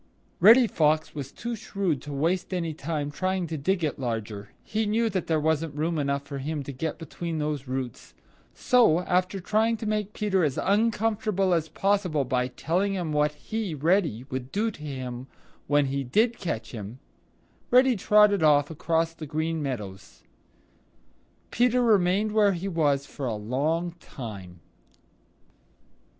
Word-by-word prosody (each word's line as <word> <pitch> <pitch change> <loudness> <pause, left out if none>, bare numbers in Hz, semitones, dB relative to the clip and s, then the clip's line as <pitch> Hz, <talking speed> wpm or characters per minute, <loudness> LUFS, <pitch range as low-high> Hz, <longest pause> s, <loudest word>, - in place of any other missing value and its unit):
Reddy 230 +7 +8
Fox 155 -6 +1
was 140 -2 -6
too 235 0 -5
shrewd 195 - -2
to 145 - -8
waste 175 +6 -1
any 165 -3 -2
time 150 -1 -3
trying 185 +4 -1
to 165 -1 -4
dig 175 +5 0
it 150 -3 -1
larger. 110 -5 -4
He 215 0 -1
knew 225 +2 +1
there 170 -4 0
wasn't 160 0 0
room 160 +2 -1
enough 140 -1 -1
for 140 0 -6
him 150 +1 -3
to 140 - -6
get 150 +4 -4
between 165 0 -5
those 150 -3 -3
roots. 130 -2 -5 0.4
So, 230 -10 +4
after 185 +2 0
trying 220 +4 +1
to 220 - -6
make 210 -1 -1
Peter 195 -4 +1
as 145 -4 0
uncomfortable 210 -2 +1
as 160 -2 0
possible 195 -8 0
by 125 0 0
telling 175 +10 -1
him 175 -4 -2
what 150 0 +2
he, 210 +1 -4
Reddy, 155 - +1
would 130 0 -4
do 220 +3 0
to 170 - -14
him 130 -3 -6 0.4
when 145 0 +3
he 135 +1 -2
did 220 - +1
catch 160 - -4
him, 110 0 -7 0.7
Reddy 255 0 +5
trotted 210 -1 +4
off 150 -1 +4
across 165 +1 0
the 155 -2 -8
Green 160 +2 -2
Meadows. 100 -9 -6 1.3
Peter 245 +1 +3
remained 205 -1 +3
where 210 -2 +4
he 180 +2 -4
was 145 -6 +1
for 135 -1 -5
a 115 - -1
long 145 +11 -1
time. 95 - -9
160 Hz, 155 wpm, -26 LUFS, 140-200 Hz, 1.3 s, Reddy